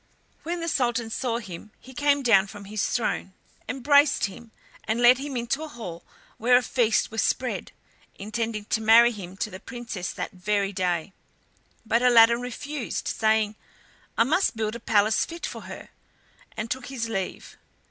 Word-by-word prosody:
When 345 Hz, +1 st, -4 dB
the 335 Hz, -, -3 dB
sultan 240 Hz, -6 st, 0 dB
saw 235 Hz, -1 st, -1 dB
him 200 Hz, -3 st, -8 dB
he 260 Hz, -, -14 dB
came 285 Hz, +1 st, +2 dB
down 205 Hz, -5 st, +5 dB
from 205 Hz, 0 st, -10 dB
his 210 Hz, 0 st, -2 dB
throne, 215 Hz, -4 st, -2 dB, 0.4 s
embraced 285 Hz, +3 st, +4 dB
him, 220 Hz, +4 st, -9 dB, 0.3 s
and 220 Hz, +2 st, -1 dB
led 245 Hz, +1 st, +6 dB
him 275 Hz, -2 st, -4 dB
into 240 Hz, +5 st, -2 dB
a 315 Hz, -, -5 dB
hall 220 Hz, -, -8 dB, 0.4 s
where 245 Hz, +2 st, +5 dB
a 250 Hz, -, +1 dB
feast 230 Hz, -3 st, +1 dB
was 225 Hz, -, -1 dB
spread, -, -, -1 dB, 0.4 s
intending 215 Hz, +1 st, -4 dB
to 220 Hz, -, -1 dB
marry 230 Hz, +2 st, +7 dB
him 190 Hz, -4 st, -9 dB
to 215 Hz, -, -3 dB
the 185 Hz, -, -8 dB
Princess 230 Hz, -6 st, -6 dB
that -, -, -5 dB
very 200 Hz, +2 st, -1 dB
day. 180 Hz, -1 st, -1 dB, 0.7 s
But 230 Hz, +2 st, +2 dB
Aladdin 235 Hz, -1 st, +6 dB
refused, 255 Hz, +2 st, -5 dB
saying, 220 Hz, -1 st, +1 dB, 0.6 s
"I -, -, +6 dB
must 315 Hz, +4 st, +1 dB
build 215 Hz, -1 st, -1 dB
a -, -, -6 dB
palace 215 Hz, -1 st, +2 dB
fit 335 Hz, 0 st, -6 dB
for -, -, -7 dB
her," -, -, -9 dB, 0.7 s
and 220 Hz, +2 st, -4 dB
took 255 Hz, -1 st, -3 dB
his 250 Hz, -3 st, -4 dB
leave. 195 Hz, -4 st, -5 dB
230 Hz, 170 wpm, -25 LUFS, 210-250 Hz, 0.7 s, marry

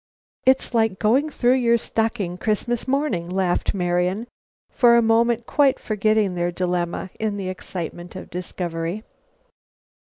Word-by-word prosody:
"It's 260 Hz, -1 st, +3 dB
like 220 Hz, -4 st, +2 dB
going 255 Hz, +10 st, +2 dB
through 255 Hz, -3 st, +2 dB
your 235 Hz, -2 st, +3 dB
stocking 220 Hz, -6 st, -2 dB
Christmas 225 Hz, +5 st, -1 dB
morning!" 260 Hz, -, 0 dB
laughed 185 Hz, +1 st, 0 dB
Marian, 180 Hz, +3 st, 0 dB, 0.5 s
for 240 Hz, -2 st, +5 dB
the 235 Hz, -, +5 dB
moment 230 Hz, +1 st, +2 dB
quite 280 Hz, -1 st, +3 dB
forgetting 215 Hz, -2 st, +1 dB
their 175 Hz, 0 st, -1 dB
dilemma 175 Hz, 0 st, -2 dB
in 215 Hz, -2 st, -1 dB
the 190 Hz, -2 st, -3 dB
excitement 175 Hz, -1 st, -6 dB
of 185 Hz, -, -9 dB
discovery. 175 Hz, +2 st, -4 dB
210 Hz, 130 wpm, -22 LUFS, 180-235 Hz, 0.5 s, for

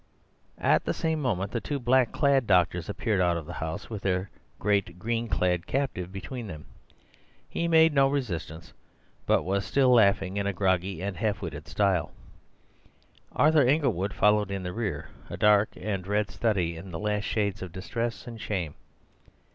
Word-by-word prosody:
At -, -, +3 dB
the -, -, -1 dB
same 160 Hz, -1 st, -1 dB
moment 100 Hz, -7 st, -1 dB
the 115 Hz, -, -2 dB
two 145 Hz, -, -3 dB
black 125 Hz, -1 st, +3 dB
clad 140 Hz, -4 st, +2 dB
doctors 90 Hz, -3 st, +2 dB
appeared 100 Hz, +1 st, 0 dB
out 85 Hz, -1 st, +2 dB
of 80 Hz, -, -6 dB
the 85 Hz, -, -7 dB
house 80 Hz, 0 st, -4 dB
with 105 Hz, -3 st, -6 dB
their 95 Hz, 0 st, -1 dB, 0.3 s
great 100 Hz, -3 st, 0 dB
green 115 Hz, +4 st, -2 dB
clad 90 Hz, -4 st, 0 dB
captive 110 Hz, -10 st, -2 dB
between 110 Hz, +5 st, -6 dB
them. 75 Hz, -5 st, -8 dB, 0.8 s
He 170 Hz, -, -2 dB
made 160 Hz, -1 st, +5 dB
no 135 Hz, -1 st, +5 dB
resistance, 85 Hz, -, -4 dB, 0.5 s
but -, -, +3 dB
was 100 Hz, +2 st, 0 dB
still 130 Hz, +7 st, +3 dB
laughing 100 Hz, -4 st, +3 dB
in 100 Hz, 0 st, 0 dB
a 100 Hz, -, 0 dB
groggy 95 Hz, -1 st, 0 dB
and 100 Hz, -2 st, -3 dB
half 105 Hz, -1 st, -1 dB
witted 75 Hz, -3 st, -6 dB
style. 95 Hz, -5 st, +1 dB, 1.2 s
Arthur 155 Hz, 0 st, +4 dB
Inglewood 125 Hz, -, +1 dB
followed 105 Hz, 0 st, +3 dB
in 100 Hz, -1 st, -3 dB
the 90 Hz, 0 st, -4 dB
rear, 110 Hz, -3 st, -3 dB, 0.2 s
a -, -, -6 dB
dark 105 Hz, 0 st, +4 dB
and 95 Hz, -3 st, -3 dB
red 105 Hz, 0 st, 0 dB
study 95 Hz, -7 st, 0 dB
in 95 Hz, +4 st, -9 dB
the 85 Hz, -, -5 dB
last 105 Hz, +2 st, -1 dB
shades 100 Hz, -3 st, -1 dB
of 90 Hz, -2 st, -6 dB
distress 115 Hz, +6 st, -4 dB
and 115 Hz, -3 st, -8 dB
shame. 90 Hz, -8 st, -3 dB
100 Hz, 170 wpm, -27 LUFS, 90-115 Hz, 1.2 s, made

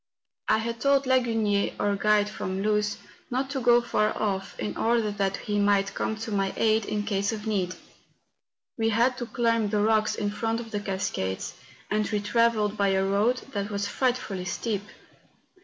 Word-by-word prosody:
I -, -, +4 dB
had 230 Hz, +1 st, -3 dB
told 275 Hz, 0 st, +3 dB
Lagunier, 225 Hz, -6 st, +1 dB
our 205 Hz, 0 st, +1 dB
guide 210 Hz, 0 st, +3 dB
from 195 Hz, -2 st, -4 dB
Luz, 210 Hz, -1 st, +1 dB, 0.3 s
not 265 Hz, +2 st, -1 dB
to 275 Hz, -, -1 dB
go 240 Hz, -1 st, +5 dB
far 215 Hz, -2 st, 0 dB
off, 195 Hz, -2 st, -2 dB
in 105 Hz, -1 st, -3 dB
order 230 Hz, -2 st, +1 dB
that 200 Hz, -1 st, -1 dB
he 205 Hz, -1 st, -2 dB
might 200 Hz, -1 st, +2 dB
come 220 Hz, -, -2 dB
to 225 Hz, -, -6 dB
my 195 Hz, -1 st, 0 dB
aid 220 Hz, -1 st, +2 dB
in 210 Hz, 0 st, -2 dB
case 200 Hz, -1 st, 0 dB
of 215 Hz, -1 st, -5 dB
need. 190 Hz, -4 st, -1 dB, 1.0 s
We 225 Hz, 0 st, +2 dB
had 235 Hz, +4 st, +3 dB
to 240 Hz, -, -4 dB
climb 230 Hz, -3 st, +1 dB
the 210 Hz, 0 st, +1 dB
rocks 215 Hz, 0 st, +2 dB
in 205 Hz, -1 st, -1 dB
front 225 Hz, +1 st, -1 dB
of 225 Hz, -1 st, -8 dB
the 205 Hz, -, -1 dB
cascades; 190 Hz, -, -3 dB, 0.4 s
and 215 Hz, 0 st, +1 dB
we 210 Hz, -, 0 dB
travelled 215 Hz, -1 st, +2 dB
by 200 Hz, -, +2 dB
a 190 Hz, 0 st, +2 dB
road 210 Hz, +6 st, +1 dB
that 200 Hz, -1 st, -2 dB
was 200 Hz, -1 st, -2 dB
frightfully 240 Hz, -5 st, -1 dB
steep. 205 Hz, +3 st, -2 dB
210 Hz, 180 wpm, -27 LUFS, 200-230 Hz, 1.0 s, go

